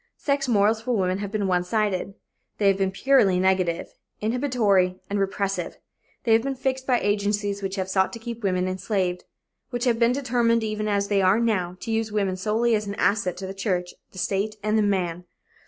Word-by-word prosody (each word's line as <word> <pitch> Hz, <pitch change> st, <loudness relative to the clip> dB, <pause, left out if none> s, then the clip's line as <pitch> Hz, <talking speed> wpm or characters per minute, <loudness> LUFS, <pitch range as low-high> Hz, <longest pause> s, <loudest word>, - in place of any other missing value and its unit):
Sex 280 Hz, -1 st, 0 dB
morals 215 Hz, -1 st, +3 dB
for 240 Hz, 0 st, -1 dB
women 185 Hz, 0 st, 0 dB
have 200 Hz, -1 st, -4 dB
been 210 Hz, -2 st, -1 dB
one 180 Hz, -2 st, +1 dB
sided; 195 Hz, 0 st, -1 dB, 0.4 s
they 205 Hz, -, +2 dB
have 195 Hz, -, +2 dB
been 190 Hz, -1 st, +2 dB
purely 195 Hz, -3 st, +3 dB
negative, 185 Hz, -2 st, +1 dB, 0.3 s
inhibitory 215 Hz, -6 st, +1 dB
and 205 Hz, -, 0 dB
repressive. 195 Hz, 0 st, -2 dB, 0.5 s
They 230 Hz, -, +3 dB
have 225 Hz, -, +5 dB
been 270 Hz, +2 st, -3 dB
fixed 265 Hz, 0 st, -2 dB
by 250 Hz, -2 st, +3 dB
agencies 205 Hz, 0 st, 0 dB
which 195 Hz, 0 st, -3 dB
have 190 Hz, -2 st, -2 dB
sought 190 Hz, 0 st, +1 dB
to -, -, -5 dB
keep 235 Hz, 0 st, -7 dB
women 185 Hz, -3 st, 0 dB
enslaved; 185 Hz, -1 st, -2 dB, 0.4 s
which 245 Hz, -1 st, -3 dB
have 235 Hz, -2 st, +2 dB
been 235 Hz, 0 st, +4 dB
determined, 240 Hz, -3 st, +1 dB
even 215 Hz, -1 st, -2 dB
as 200 Hz, -1 st, +1 dB
they 200 Hz, -1 st, +2 dB
are 190 Hz, +4 st, +4 dB
now, 185 Hz, -6 st, 0 dB
to 230 Hz, -, -4 dB
use 225 Hz, -1 st, -1 dB
woman 200 Hz, -3 st, 0 dB
solely 220 Hz, +5 st, +1 dB
as 210 Hz, -1 st, 0 dB
an 200 Hz, -, -4 dB
asset 200 Hz, -2 st, +1 dB
to 195 Hz, -, -5 dB
the 190 Hz, -, -5 dB
church, 185 Hz, -3 st, -2 dB, 0.2 s
the -, -, -14 dB
state 200 Hz, +3 st, -1 dB
and 215 Hz, 0 st, +1 dB
the 220 Hz, -, +4 dB
man. 180 Hz, -4 st, -1 dB
205 Hz, 205 wpm, -24 LUFS, 190-225 Hz, 0.5 s, have